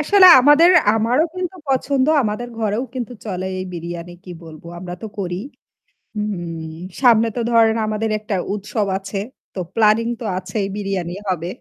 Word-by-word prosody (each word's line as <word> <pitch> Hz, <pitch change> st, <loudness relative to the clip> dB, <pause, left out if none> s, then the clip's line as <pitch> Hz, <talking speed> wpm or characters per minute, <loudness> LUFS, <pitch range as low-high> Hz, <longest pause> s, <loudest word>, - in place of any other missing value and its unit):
আসলে 375 Hz, +5 st, +6 dB
আমাদের 295 Hz, +6 st, +6 dB, 0.3 s
আমারও 240 Hz, +8 st, +2 dB
কিন্তু 365 Hz, 0 st, -4 dB
পছন্দ। 270 Hz, +1 st, +1 dB, 0.2 s
আমাদের 225 Hz, +3 st, -3 dB
ঘরেও 220 Hz, +2 st, -1 dB
কিন্তু 250 Hz, -2 st, -4 dB
চলে 185 Hz, -3 st, -3 dB, 0.2 s
এই 185 Hz, -, -4 dB
বিরিয়ানি 170 Hz, +1 st, -6 dB
কি 185 Hz, -, -10 dB
বলব, 155 Hz, -2 st, -12 dB, 0.2 s
আমরা 175 Hz, 0 st, -6 dB
তো -, -, -4 dB
করি। 180 Hz, -2 st, -3 dB, 0.8 s
হুম। 175 Hz, -6 st, -4 dB, 0.3 s
সামনে 230 Hz, -3 st, +5 dB
তো -, -, 0 dB
ধরেন 225 Hz, -1 st, +4 dB
আমাদের 215 Hz, +1 st, -1 dB
একটা 210 Hz, -1 st, -3 dB, 0.2 s
উৎসব 210 Hz, +1 st, -2 dB
আছে। 195 Hz, +1 st, -6 dB, 0.4 s
তো -, -, -6 dB, 0.2 s
প্ল্যানিং 225 Hz, +1 st, +3 dB
তো -, -, -4 dB
আছেই 200 Hz, +1 st, -3 dB
বিরিয়ানি 195 Hz, -4 st, -3 dB, 0.2 s
হবে। 175 Hz, -2 st, -2 dB
215 Hz, 155 wpm, -20 LUFS, 185-240 Hz, 0.8 s, আসলে